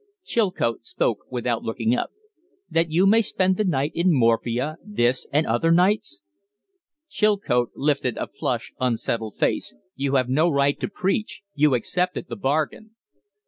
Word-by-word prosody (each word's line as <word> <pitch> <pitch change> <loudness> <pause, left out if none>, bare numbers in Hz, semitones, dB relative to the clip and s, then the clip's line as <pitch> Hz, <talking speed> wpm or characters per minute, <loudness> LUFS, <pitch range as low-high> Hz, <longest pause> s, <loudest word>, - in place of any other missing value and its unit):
Chilcote 185 - 0
spoke 115 -1 -1
without 120 -2 -2
looking 115 +1 -1
up. - - -1 0.6
"That 165 0 +2
you 170 +5 +3
may 220 +3 +5
spend 190 -3 +1
the 215 - +1
night 150 -6 0
in 175 +2 +2
morphia 125 +2 +1
this 130 - 0
and 150 +3 +2
other 120 +9 +1
nights?" 180 - +2 0.8
Chilcote 205 - +1
lifted 140 -4 0
a - - -2
flushed, - - -4
unsettled 115 -3 -1
face. - - 0 0.2
"You 140 0 -1
have 130 -2 +2
no 155 +7 +3
right 140 -2 +1
to - - -2
preach. 195 +2 -2
You 145 -2 +3
accepted 180 +9 -2
the - - -4
bargain." 160 +7 -2
145 Hz, 145 wpm, -24 LUFS, 120-185 Hz, 0.8 s, may